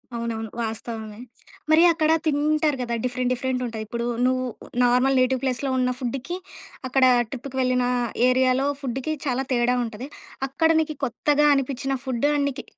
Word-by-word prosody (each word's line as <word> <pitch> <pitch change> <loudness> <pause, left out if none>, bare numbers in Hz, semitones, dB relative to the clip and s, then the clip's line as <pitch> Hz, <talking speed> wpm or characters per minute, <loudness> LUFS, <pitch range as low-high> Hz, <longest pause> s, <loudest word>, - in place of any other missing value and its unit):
అవునవును. 225 -2 -4
వాస్తవమే. 220 -1 -5 0.5
మరి 320 +2 +6
అక్కడ 315 -1 +1
తింటారు 300 0 +1
గదా! 235 -1 -2
డిఫరెంట్ 250 0 -1
డిఫరెంట్ 255 0 -2
ఉంటాయి. 220 -1 -5
ఇప్పుడు 235 +2 -3 0.2
నువ్వు 255 0 +1 0.4
నార్మల్ 250 +2 +3
నేటివ్ 255 0 +2
ప్లేస్‌లో 265 +1 -1
ఉన్న 250 0 +1
ఫుడ్‌కి, 270 +7 -4 0.5
అక్కడ 265 0 +2 0.3
ట్రిప్‌కి 265 +1 -7
వెళ్ళిన 250 -1 +1 0.4
ఏరియాలో 255 +1 +2 0.2
ఫుడ్‌కి 265 +3 -3
చాలా 260 -1 0
తేడా 245 0 +2
ఉంటది. 235 +2 -6 0.4
అక్కడ 320 +4 +1
నీకు 310 -1 -4
కొత్తగా 295 +5 +2
అనిపించిన 275 -1 -2
నికి 275 +1 -1
255 Hz, 135 wpm, -24 LUFS, 245-275 Hz, 0.5 s, మరి